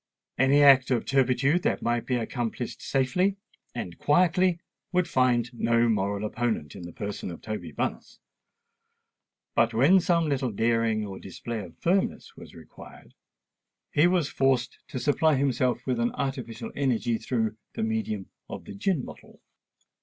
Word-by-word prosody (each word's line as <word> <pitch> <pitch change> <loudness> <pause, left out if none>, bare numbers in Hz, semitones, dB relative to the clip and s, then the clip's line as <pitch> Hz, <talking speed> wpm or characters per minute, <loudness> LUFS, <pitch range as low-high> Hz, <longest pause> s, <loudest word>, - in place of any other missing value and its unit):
Any 140 +2 +5
act 135 -2 +7
of 125 -3 +1
turpitude 135 +4 +2
that - - -1
might 120 -1 -1
be 125 - +1
accomplished 120 0 -3
safely 180 +9 +1 0.4
and 90 -8 -6
quietly 180 +3 +3 0.3
would 180 -1 +1
find 125 -3 +1
no 115 0 +2
moral 100 -1 0
opponent 110 - -2
in - - -9
the - - -9
person 100 +1 -5
of 85 - -8
Toby 110 -1 -6
Bunce; - - -4 1.4
but 115 - +2
when 150 +11 +6
some 170 -3 +1
little 135 -3 0
daring 115 0 +1
or 95 -2 -7
display 115 +4 -6
of 85 -5 -10
firmness 185 +3 -1
was - - -13
required, 80 -2 -14 0.8
he 155 +4 +4
was 175 -5 +2
forced 130 -3 0
to 140 -2 -6
supply 145 +4 +2
himself 130 -2 0
with 125 -2 -1
an 120 +1 +1
artificial 130 -4 -4
energy 120 -4 0
through 110 -3 -2 0.2
the - - -2
medium 110 -3 -2 0.2
of - - -7
the - - -8
gin 150 - -1
bottle. - - -13
125 Hz, 150 wpm, -27 LUFS, 110-140 Hz, 1.4 s, act